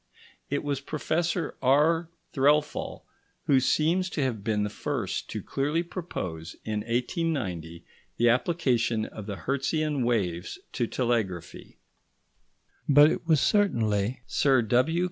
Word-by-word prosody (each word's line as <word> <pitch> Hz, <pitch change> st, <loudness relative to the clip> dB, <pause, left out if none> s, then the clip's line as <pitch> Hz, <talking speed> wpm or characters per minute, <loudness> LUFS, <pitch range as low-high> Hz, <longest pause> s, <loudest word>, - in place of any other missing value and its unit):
It 145 Hz, -, -1 dB
was 140 Hz, -2 st, -2 dB
Professor 160 Hz, +4 st, -1 dB
R. 155 Hz, +5 st, +3 dB, 0.2 s
Threlfall 150 Hz, +2 st, +1 dB, 0.4 s
who 135 Hz, -2 st, +4 dB
seems 170 Hz, +7 st, +2 dB
to 150 Hz, -, -1 dB
have 115 Hz, -6 st, -2 dB
been 105 Hz, -2 st, 0 dB
the 105 Hz, -, -2 dB
first 120 Hz, -4 st, -3 dB
to -, -, -5 dB
clearly 150 Hz, +5 st, -1 dB
propose, 90 Hz, -, -6 dB
in 110 Hz, -1 st, -1 dB
1890, 115 Hz, -, -2 dB, 0.3 s
the 120 Hz, -, +3 dB
application 120 Hz, -4 st, +1 dB
of 105 Hz, -1 st, -9 dB
the 100 Hz, -, -3 dB
Hertzian 140 Hz, -, -1 dB
waves 95 Hz, -8 st, -1 dB, 0.2 s
to 120 Hz, -, 0 dB
telegraphy, 115 Hz, -10 st, -2 dB, 1.1 s
but 145 Hz, +2 st, +7 dB
it -, -, -4 dB
was 160 Hz, -3 st, +4 dB
certainly 120 Hz, -, +1 dB
Sir 135 Hz, -4 st, +3 dB
W. 130 Hz, +9 st, +2 dB
130 Hz, 125 wpm, -27 LUFS, 110-155 Hz, 1.1 s, but